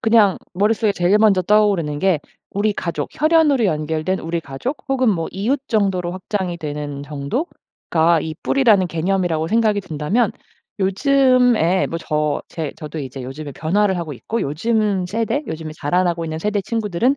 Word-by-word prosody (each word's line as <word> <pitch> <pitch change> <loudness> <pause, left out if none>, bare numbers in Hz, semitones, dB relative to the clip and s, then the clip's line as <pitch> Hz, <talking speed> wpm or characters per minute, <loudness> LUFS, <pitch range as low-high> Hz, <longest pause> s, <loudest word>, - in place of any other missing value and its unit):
그냥 220 -4 +4 0.2
머릿속에 210 +3 +2
제일 185 +2 +2
먼저 210 -3 +4
떠오르는 195 -7 +2
게 185 -1 +2 0.3
우리 205 +2 0
가족 165 -7 -3
혈연으로 310 -5 +3
연결된 160 +1 -1
우리 165 0 -3
가족 160 - -4
혹은 260 -2 +2
뭐 165 -5 -1
이웃 235 +9 -1
정도로 195 -5 0
확장이 185 -2 -3
되는 145 -2 -5
정도가 160 - -1
이 160 -1 -4
뿌리라는 220 -9 +4
개념이라고 170 -1 0
생각이 215 +1 +2
든다면 185 +6 0 0.5
요즘에 245 - +3
뭐 165 - -4
저 150 -2 -1
제 160 -4 -4
저도 155 +1 -7
이제 135 -2 -6
요즘에 140 +3 -7
변화를 190 +6 +1
하고 160 -4 -4
있고 225 - -4
요즘 200 +4 0
세대 225 +8 -1
요즘에 160 -1 -5
자라나고 170 +2 0
있는 160 -1 -4
세대 205 +4 0
친구들은 225 +4 0
185 Hz, 355 characters per minute, -20 LUFS, 160-215 Hz, 0.5 s, 그냥